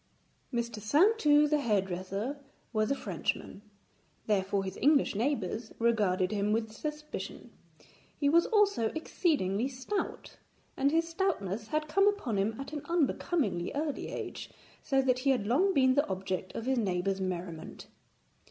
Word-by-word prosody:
Mr. 235 -3 -3
Saintou 300 - +4
the 300 0 +2
hairdresser 200 +2 -1 0.3
was 215 +1 +1
a 275 - +2
Frenchman, 205 - -3 0.6
therefore 195 -1 +1
his 190 -1 -5
English 290 +1 +3
neighbours 225 -1 -2
regarded 205 -6 +2
him 205 0 0
with 220 0 0
suspicion. 300 +6 -6 0.7
He 285 - +2
was 335 +4 +4
also 410 - +3
exceedingly 260 - 0
stout, 270 +10 -4 0.4
and 275 +1 +2
his 330 +2 +1
stoutness 235 - -2
had 305 +4 -1
come 395 +6 +3
upon 405 - 0
him 220 +4 -1
at 275 +2 -7
an 295 - -3
unbecomingly 295 - 0
early 295 0 -2
age, - - -6 0.3
so 270 -1 +1
that 255 -1 +2
he 275 +2 +1
had 250 -6 +2
long 315 - +3
been 260 -6 +4
the 285 +2 +2
object 185 -1 -3
of 230 - -4
his 260 -1 +1
neighbours' 190 -1 0
merriment. 175 -3 -5
245 Hz, 145 wpm, -30 LUFS, 200-300 Hz, 0.7 s, Saintou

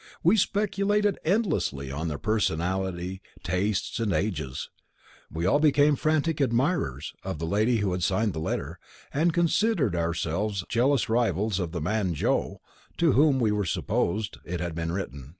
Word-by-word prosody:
We 175 +6 +5
speculated 205 0 +1
endlessly 155 - 0
on 75 +4 -3
their 75 -2 -3
personalities, 95 -1 -1 0.2
tastes, 95 +5 -1
and 110 -3 0
ages. 75 -12 -2 0.6
We 80 +2 -2
all 140 +10 +4
became 145 -1 +4
frantic 155 +1 0
admirers 120 - 0
of - - -4
the 80 - -3
lady 110 +7 +2
who 95 - 0
had 90 0 -2
signed 95 +4 +1
the 80 - -4
letter, 80 - -3 0.3
and 160 +5 +2
considered 170 - +2
ourselves 85 +4 -1
jealous 125 0 +2
rivals 110 -3 +1
of 90 -3 -2
the 85 -2 -4
man 95 0 0
'Joe,' - - -1 0.4
to 170 -3 +4
whom, 145 +1 +4
as 130 - 0
we 105 -2 +1
supposed, 105 +6 -1
it 90 0 -4
had 85 0 -3
been 80 0 -3
written. 70 -8 -5
105 Hz, 155 wpm, -27 LUFS, 85-145 Hz, 0.6 s, We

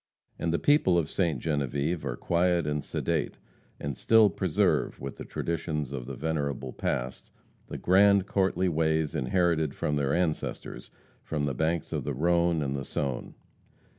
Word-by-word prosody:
And 85 - 0
the 85 - +2
people 145 - +3
of 80 -2 0
Ste. 85 -7 +1
Genevieve 75 +3 -1
are - - -3
quiet 85 +2 +1
and 75 0 -1
sedate, - - -2 0.4
and 70 -2 -4
still 110 - +5
preserve, 90 -4 +1
with 70 +1 -6
the - - -6
traditions 75 -4 -3
of 60 -3 -5
the 70 - -5
venerable 70 -3 -2
past, 60 +1 -3 0.4
the - - -6
grand, 100 +1 +4
courtly 95 -2 +1
ways 80 -2 +1
inherited 80 +1 +1
from 75 - -1
their 70 -1 +1
ancestors 85 -4 -3 0.3
from 75 -2 -2
the 70 - -1
banks 80 +4 -1
of - - -2
the - - -3
Rhone 85 +1 +2
and 70 -1 -2
the 70 - -3
Saone. 65 -1 -3
80 Hz, 160 wpm, -28 LUFS, 70-85 Hz, 0.4 s, still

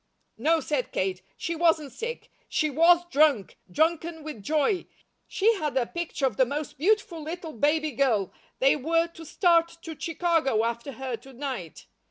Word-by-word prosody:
"No," 325 +1 +3
said 275 -3 -2
Kate, 185 -1 -1 0.2
"she 335 - -3
wasn't 320 -4 +2
sick. 465 - -6 0.2
She 310 -2 0
WAS 340 +4 +5
drunk, 280 -9 +2
drunken 320 - 0
with 300 -8 -7
joy. 310 - 0 0.4
She 440 +4 +3
had 300 -6 -2
a 250 - +2
picture 340 -1 -3
of 250 -7 -1
the - - +5
most 290 0 -5
beautiful 370 -2 +1
little 325 +1 -6
baby 300 +5 +1
girl. 230 -7 +1 0.2
They 270 +1 +4
were 330 +4 +1
to 330 -1 -12
start 335 0 +2
to 325 -1 -7
Chicago 325 -9 +1
after 235 +4 -3
her 260 -2 -4
to 270 +3 -15
night. 250 - -6
310 Hz, 165 wpm, -27 LUFS, 265-335 Hz, 0.4 s, WAS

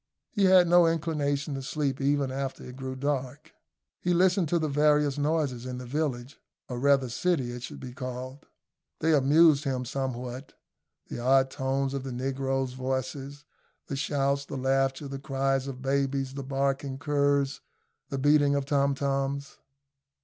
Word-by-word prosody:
He 205 -4 +2
had 185 -2 +6
no 175 0 +6
inclination 150 -3 -1
to 135 - -4
sleep 140 0 -2
even 140 -1 +1
after 135 0 -4
it 125 - -9
grew 130 0 -5
dark. 140 +2 -3 0.5
He 175 0 +1
listened 180 -2 +3
to 175 - +2
the 160 -2 0
various 150 0 +2
noises 145 -5 0
in 125 0 -5
the 125 - -7
village, 135 -1 -3 0.3
or 125 -1 -4
rather 140 -1 +3
city 130 0 0
it 120 0 -7
should - - -8
be 125 -2 -8
called. 130 +2 -7 0.5
They 160 +1 +2
amused 150 +1 +5
him 130 -3 -2
somewhat 130 0 -4 0.6
the - - -5
odd 130 +2 +3
tones 135 +1 -1
of 140 - -2
the 135 0 -6
negroes' 135 0 -2
voices, 130 +2 -4 0.4
the 140 - -4
shouts, 140 0 0
the 140 - -6
laughter, 135 +2 0
the 135 0 -6
cries 135 -1 0
of 130 -1 -7
babies, 135 -1 0
the 140 - -5
barking 135 0 -1
of - - -10
curs, 145 -2 +1 0.5
the 135 - -3
beating 145 +1 +4
of 140 -1 -1
tom 140 -1 +2
toms. 140 0 -2
135 Hz, 165 wpm, -28 LUFS, 130-145 Hz, 0.6 s, had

